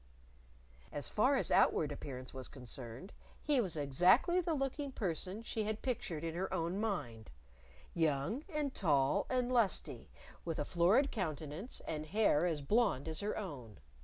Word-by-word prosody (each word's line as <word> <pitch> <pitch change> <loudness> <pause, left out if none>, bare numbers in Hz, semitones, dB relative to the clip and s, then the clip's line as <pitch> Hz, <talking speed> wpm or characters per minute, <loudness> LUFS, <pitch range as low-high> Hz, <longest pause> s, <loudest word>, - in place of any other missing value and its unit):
As - - -3
far - - +3
as - - 0
outward - - +4
appearance 130 -2 -7
was 130 -1 -4
concerned, 125 - -6 0.3
he 290 -4 +3
was 180 -7 -2
exactly 180 - +4
the 335 -2 -1
looking 275 0 -2
person 190 0 -3
she 225 -1 -2
had 215 0 -3
pictured 190 - -2
in 165 -1 -2
her 185 +3 -3
own 175 +1 -1
mind 120 - -3 0.6
young 165 - 0
and 300 -5 -2
tall 140 -7 +2
and 255 -1 0
lusty, 235 -6 +1 0.3
with 165 -2 -3
a 145 - -1
florid 185 - +3
countenance 165 - -4
and 155 -1 -3
hair 180 -4 +3
as 155 -4 -2
blonde 200 - +2
as 160 -1 -3
her 210 +1 -2
own. 135 - -7
180 Hz, 155 wpm, -35 LUFS, 145-230 Hz, 0.6 s, outward